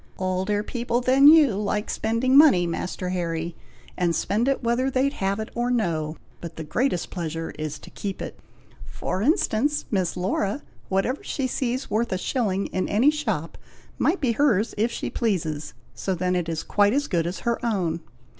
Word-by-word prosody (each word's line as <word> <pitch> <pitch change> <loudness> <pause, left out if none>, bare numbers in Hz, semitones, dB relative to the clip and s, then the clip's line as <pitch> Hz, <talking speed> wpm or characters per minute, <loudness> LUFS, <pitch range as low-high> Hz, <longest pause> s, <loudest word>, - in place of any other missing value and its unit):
"Older 190 +2 0
people 240 +1 -1
than 260 +3 +5
you 300 -6 +7
like 210 +1 -1
spending 230 +4 +1
money, 275 - +7
Master 180 +2 -3
Harry, 170 -2 -2 0.4
and 175 -2 +1
spend 225 +5 0
whether 245 +2 +1
they 265 +1 +2
have 200 -6 -2
it 220 - -4
or 240 +1 -1
no; 165 -10 -1 0.2
but 170 -1 -8
the 160 - -5
greatest 180 - -1
pleasure 165 -2 -4
is 155 -1 -3
to - - -14
keep 195 -2 -5
it. - - -7 0.5
For 190 - -3
instance, 290 - +1
Miss 185 -4 0
Laura, 195 +6 -1 0.3
whatever 195 +8 0
she 270 - -2
sees 255 0 -2
worth 230 +3 0
a 185 - +1
shilling 200 -2 -1
in 185 - -1
any 240 +9 +4
shop, 300 0 -3 0.4
might 355 +5 +2
be 265 -6 +1
hers 230 -4 +2
if 225 +3 +1
she - - -4
pleases; 160 - -2 0.2
so 190 - -2
then 180 +1 0
it 175 -2 -1
is 165 -1 -2
quite 205 +1 +3
as 285 +2 +1
good 170 - 0
as 180 - -5
her 235 0 -1
own. 180 -8 0
205 Hz, 175 wpm, -24 LUFS, 180-245 Hz, 0.5 s, you